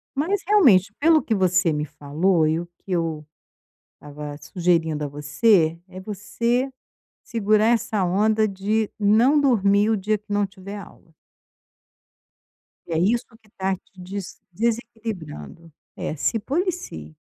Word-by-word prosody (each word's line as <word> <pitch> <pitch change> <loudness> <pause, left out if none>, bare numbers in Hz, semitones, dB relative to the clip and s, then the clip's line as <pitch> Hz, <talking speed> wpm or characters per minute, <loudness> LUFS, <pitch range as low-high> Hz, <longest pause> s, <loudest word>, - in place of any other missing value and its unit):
Mas 350 +8 0
realmente 250 - +5
pelo 315 +1 +5
que 225 - -1
você 185 -3 +2
me 150 0 -1
falou 155 +4 +1
e 160 +1 +1
o 175 - -6
que 195 - -12
eu 165 -3 -1 0.7
estava 145 0 -8
sugerindo 160 0 0
a - - -1
você, 160 +4 +2
é 185 0 -10
você 235 +6 -1 0.5
segurar 215 -1 +2
essa 225 -3 +1
onda 215 +4 +2
de 205 +2 -1
não 225 +8 +4
dormir 205 -6 +3
o 220 - +2
dia 210 +2 0
que 210 0 -16
não 205 0 +2
tiver 195 +1 -9
aula. 175 -4 -14 1.7
E 170 - -5
é 160 - +1
isso 225 +7 +2 0.2
que 220 - -26
está 190 -1 -2
te 185 +1 -8 0.2
desequilibrando, 220 - -4 0.2
é - - -4
se 225 +9 0
policie. 285 - -3
200 Hz, 135 wpm, -23 LUFS, 165-225 Hz, 1.7 s, realmente